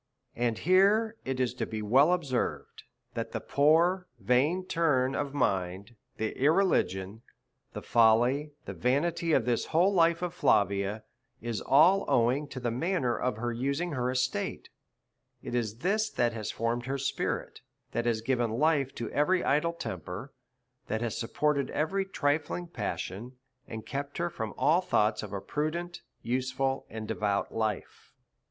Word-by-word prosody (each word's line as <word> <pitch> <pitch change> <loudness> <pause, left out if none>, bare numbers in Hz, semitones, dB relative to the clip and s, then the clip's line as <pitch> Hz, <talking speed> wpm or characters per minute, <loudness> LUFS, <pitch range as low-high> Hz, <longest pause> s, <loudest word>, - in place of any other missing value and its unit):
And 120 -2 0
here 200 - +3
it 130 -1 -2
is 125 -2 +1
well 125 - -20
to - - 0
be 110 - -4 0.2
observed, 145 -3 +1 0.3
that - - -4
the - - -1
poor 170 +6 +3
vain 145 +11 +2
turn 140 -7 +1
of 140 0 -3
mind, 95 -2 -1 0.2
the 110 0 -2
irreligion, 115 - +2 0.5
the - - -6
folly 120 +6 +3 0.2
and - - -6
vanity 160 +6 +1
of 125 - +3
this 120 -1 0
whole 175 +5 +3
life 170 -1 +3
of 175 -1 -2
Flavia, 100 - +1 0.4
is 115 -2 -4
all 170 +9 +5
owing 125 +5 +2
to 130 - -7
the 120 -2 -1
manner 130 -1 0
of 125 -4 -2 0.2
using 140 +8 -1
her 125 -3 -1
estate; 125 -4 -2 0.7
it - - -6
is 115 -3 -1
this 215 +3 +2
that 120 -1 0
has 110 -2 -4
formed 120 +2 -2
her 135 +1 -1
spi 140 +1 -2
rit, - - -4 0.3
that 120 0 -1
has 115 -2 +1
given 120 -1 0
life 140 +2 +1
to 115 - -4
every 180 +5 +2
idle 160 +4 +1
temper, 100 - -6 0.5
that 110 +1 -2
has 120 -2 -2
supported 140 +4 0
every 195 +6 -1
trifling 155 -1 -1
passion, 120 - -5 0.3
and 110 -1 -7
kept 140 +1 -5
her 170 0 -1
from 110 -6 -5
all 160 +5 +3
thoughts 110 - +1
of - - -7
a 100 - -3
prudent, 170 - -3 0.2
useful, 130 +2 -1
and 110 -1 -6
devout 100 -2 -1
life. 110 -3 -3
130 Hz, 155 wpm, -29 LUFS, 115-165 Hz, 0.7 s, all